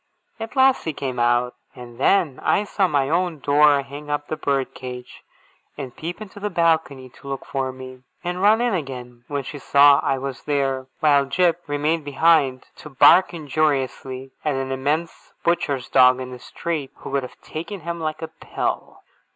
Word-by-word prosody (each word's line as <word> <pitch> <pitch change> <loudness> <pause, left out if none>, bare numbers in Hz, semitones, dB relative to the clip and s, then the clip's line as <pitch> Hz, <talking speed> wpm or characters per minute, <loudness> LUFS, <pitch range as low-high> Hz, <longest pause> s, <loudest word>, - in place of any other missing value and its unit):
At 225 +3 -7
last 265 0 +4
he 160 - -2
came 130 -3 -4
out; 120 +1 +2 0.2
and 120 -1 -11
then 155 -3 +2
I 205 - +2
saw 200 -2 +1
my 140 -5 +1
own 170 +1 0
Dora 145 0 +4
hang 145 +2 -10
up 145 0 -2
the 155 - -1
bird 140 -3 -1
cage, 125 -1 -9 0.6
and 135 -4 -7
peep 170 +4 -6
into 205 -1 -10
the 210 +1 -2
balcony 160 -6 +1
to 140 - -16
look 135 -1 -5
for 135 -1 -2
me, 130 0 -11 0.2
and 180 +1 -3
run 215 +3 +5
in 240 -2 +1
again 125 -7 -6
when 140 -1 -3
she 145 +3 -7
saw 140 0 +6
I 135 - 0
was 135 -1 -5
there, 135 -3 -1
while 145 -2 +4
Jip 175 +3 +1
remained 150 +2 0
behind, 145 -2 +2
to 150 - -10
bark 165 +6 +6
injuriously 135 -4 -2
at 150 -3 0
an 135 0 -3
immense 145 +6 -2
butcher's 145 -6 0
dog 130 -1 +5
in 130 0 -6
the 125 - -9
street, 155 0 -4
who - - -9
could 140 0 +1
have 125 - -10
taken 175 +5 -7
him 170 +1 -5
like 155 0 -4
a - - -3
pill. 160 - -5
145 Hz, 185 wpm, -22 LUFS, 130-165 Hz, 0.6 s, saw